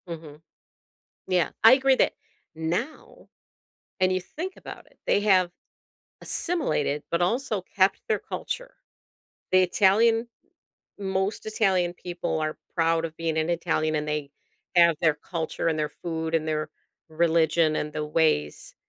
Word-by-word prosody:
Mhm. 160 -3 -9 0.9
Yeah, 180 -2 +1
I 225 - +9
agree 265 0 +5
that - - +2 0.4
now, 170 - -4 0.7
and 185 -1 +3
you 185 - 0
think 350 - -7
about - - -10
it, - - -27
they - - +3
have 190 -4 +3 0.7
assimilated, 215 - -1
but 170 +1 +1
also 215 +1 0
kept 190 +1 +1
their 215 - +2
culture. - - -6 0.8
The 185 0 +5
Italian 225 +5 +3 0.7
most 190 +1 -2
Italian 190 -5 +1
people 175 -3 -3
are 155 0 -2 0.2
proud 165 0 +2
of 160 -1 -7
being 165 -1 -1
an 160 +1 0
Italian 160 -2 0
and 150 0 -2
they 150 -2 -2 0.5
have 170 -1 +6
their 160 -3 +3
culture 165 +1 -4
and 160 -1 0
their 150 -1 0
food 160 -1 -3
and 160 -1 0
their 155 -1 -1 0.4
religion 160 -1 +2
and 150 - -2
the 150 0 -3
ways 150 - 0
170 Hz, 140 wpm, -26 LUFS, 155-195 Hz, 0.9 s, I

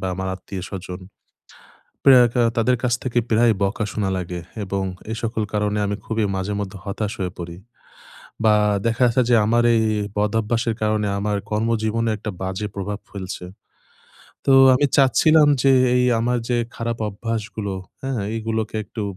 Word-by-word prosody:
বা 95 - -3
আমার 95 0 -4
আত্মীয়স্বজন। 95 -1 -7 1.0
প্রায় 130 -3 +7
কা 120 - +2 0.2
তাদের 125 +2 +3
কাছ 125 -1 +2
থেকে 125 -1 +1
প্রায় 115 0 +4
বকা 100 +2 -1
শোনা 100 -3 -1
লাগে, 90 -1 -4 0.2
এবং 100 0 -2 0.3
এই 110 - -3
সকল 110 -1 -1
কারণে 105 0 0
আমি 100 0 -1
খুবই 110 -1 0
মাঝে 95 +2 -2
মধ্যে 100 -1 -5
হতাশ 105 +1 -3
হয়ে 90 -2 -2
পড়ি, 85 0 -6 0.9
বা 110 - +6 0.3
দেখা 115 +2 +1
গেছে 120 +2 +2
যে, 120 - +5
আমার 120 +2 +3
এই, 110 - +3 0.2
এই - - -4
বদভ্যাসের 110 +2 0
কারণে 105 -1 +1
আমার 105 0 -1
কর্মজীবনে 115 +1 0
একটা 105 0 -5
বাজে 95 +3 -3
প্রভাব 100 +1 -4
ফেলছে। 95 -2 -6 1.0
তো 135 - +5 0.2
আমি 145 +3 +3
চাচ্ছিলাম, 150 +3 +5
যে 135 - +5 0.2
এই 125 - +3 0.2
আমার 125 +1 +1
যে 120 - +1 0.2
খারাপ 115 0 -3
অভ্যাসগুলো, 105 -1 -4 0.3
হ্যাঁ? 135 -4 -2 0.2
এগুলোকে 110 -1 -3
একটু 110 - -6
110 Hz, 155 wpm, -22 LUFS, 100-115 Hz, 1.0 s, প্রায়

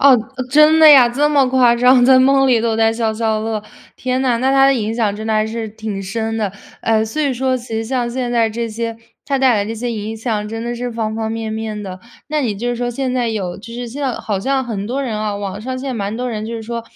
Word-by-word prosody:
哦， 280 0 +7 0.3
呃， 255 - -3
真 305 +3 +6
的 315 - +9
呀， 255 -4 +8
这 285 +5 +1
么 280 -3 +4
夸 250 -2 +4
张， 250 +1 +5
在 260 0 +6
梦 270 +1 +4
里 235 -3 +4
都 225 -1 0
在 225 0 +3
消 225 -1 -1
消 220 -1 0
乐。 220 -1 -3 0.3
天 255 0 -2
哪， 245 -3 +2
那 260 +2 +1
它 270 0 +5
的 275 - +4
影 220 -2 -2
响 220 -3 0
真 215 +1 -7
的 220 - -1
还 215 0 +2
是 225 0 -4
挺 210 -2 -6
深 225 +3 -3
的， 205 -4 -2 0.3
哎， 220 -1 +2
所 300 +8 -3
以 280 - +1
说 260 +1 0
其 245 0 -10
实 225 0 -2
像 240 0 -1
现 245 -1 -3
在 230 -2 +2
这 230 +1 -3
些， 230 +1 -4 0.3
它 275 -1 0
带 260 -3 +4
来 200 -1 0
这 220 - -4
些 235 +2 -4
影 220 +1 -5
响 215 -2 -3
真 225 +1 -5
的 240 0 -3
是 245 +1 -4
方 225 -2 -3
方 220 0 -3
面 225 -1 -4
面 220 -1 -4
的。 185 -2 -7 0.3
那 305 0 -1
你 215 -5 -1
就 240 +3 -2
说 245 0 -2
现 255 +1 -2
在 245 -2 0
有 190 -5 -3
就 230 +3 -11
是 245 0 -5
现 275 +5 -6
在 265 -3 0
好 205 -3 -3
像 265 +4 0
很 210 -5 -4
多 255 +6 -3
人 245 -6 -3
啊， 210 -1 -2
网 200 0 -5
上 255 +1 -4
现 270 - -6
在 255 - -3
蛮 200 -2 -2
很 215 - -5
多 250 +1 -3
人 215 -2 -4
就 230 - -5
是 225 - -6
说 235 +1 -5
230 Hz, 300 characters per minute, -18 LUFS, 220-255 Hz, 0.3 s, 的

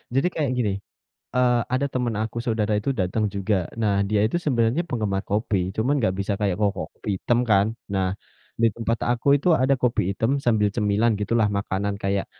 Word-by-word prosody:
jadi 135 +6 +3
kayak 145 -5 -1
gini, 110 -5 +1 0.6
eee, 125 -1 +3
ada 135 +2 +1
temen 125 -3 -1
aku 110 +1 -4
saudara 110 -2 0
itu 105 +6 -2
datang 95 +4 0
juga. 100 +1 0 0.3
Nah 105 -2 +2 0.2
dia 105 -1 +2
itu 120 - 0
sebenarnya 125 +4 +2
penggemar 105 -6 -1
kopi, 105 -1 0 0.2
cuman 125 +6 +1
nggak 110 -5 +1
bisa 100 +1 -1
kayak 100 -4 +1
ko 105 - +4
kopi - - -7
item 120 +4 +1
kan. 100 -1 +5 0.3
Nah 95 -1 +1 0.5
di 115 - +6
tempat 115 0 -1
aku 120 +2 -1
itu 145 - -3
ada 135 +1 +4
kopi 125 -1 +2
item 115 +6 0
sambil 105 -3 +3
cemilan 105 +1 +2
gitulah, 110 0 +2
makanan 100 0 -2
kayak, 100 0 0
110 Hz, 185 wpm, -24 LUFS, 100-120 Hz, 0.6 s, di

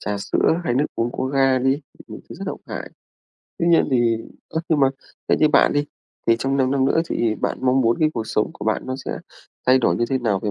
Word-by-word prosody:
trà 105 -1 -3
sữa 165 - +1
hay 120 - 0
nước 145 +3 +2
uống 120 +1 -1
có - - -3
ga 135 -1 +2
đi, 135 +3 +1 0.3
những - - -9
thứ - - -9
rất - - -7
độc - - -5
hại. - - -6 0.7
Tuy 170 - 0
nhiên 170 - +4
thì 120 -3 +3 0.3
ơ, 160 - -2
nhưng 155 -3 +2
mà 135 - +5 0.4
theo - - +3
như 155 - +5
bạn 150 - +4
đi, 145 0 +1 0.4
thì 115 0 +4
trong 135 +3 0
5 130 -1 +2
năm 135 -1 +2
nữa 140 +4 +3
thì 115 -2 0
bạn - - -2
mong 130 +1 +3
muốn 115 -1 +2
cái 155 -1 +3
cuộc 115 -1 -3
sống 105 - 0
của - - -9
bạn 110 0 0
nó 130 - -3
sẽ - - -4 0.5
thay 130 +1 +6
đổi 85 -9 +2
như 120 - +1
thế 130 - +1
nào 105 -6 0
về 105 - -2
130 Hz, 255 wpm, -22 LUFS, 115-140 Hz, 0.7 s, thay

